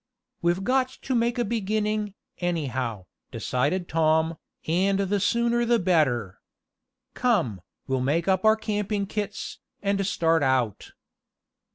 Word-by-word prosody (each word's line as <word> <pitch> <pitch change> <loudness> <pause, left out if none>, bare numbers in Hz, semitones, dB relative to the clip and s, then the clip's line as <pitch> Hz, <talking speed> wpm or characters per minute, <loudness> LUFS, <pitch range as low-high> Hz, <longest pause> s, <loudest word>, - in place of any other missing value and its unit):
"We've 175 +2 +1
got 255 +2 +2
to 265 - -1
make 235 0 +1
a 240 - +1
beginning, 215 -1 -1 0.2
anyhow," 130 - -2 0.2
decided 150 +8 -1
Tom, 160 0 +2 0.3
"and 190 +4 +2
the 200 +1 +1
sooner 235 +3 +2
the 235 0 +3
better. 135 - +1 0.7
Come, 170 - +1 0.2
we'll 130 -1 -1
make 155 +7 0
up 190 -1 +2
our 220 0 +6
camping 210 -2 -2
kits, 205 0 -4 0.2
and 200 -1 0
start 165 -5 +2
out." 130 -6 0
190 Hz, 125 wpm, -26 LUFS, 155-215 Hz, 0.7 s, our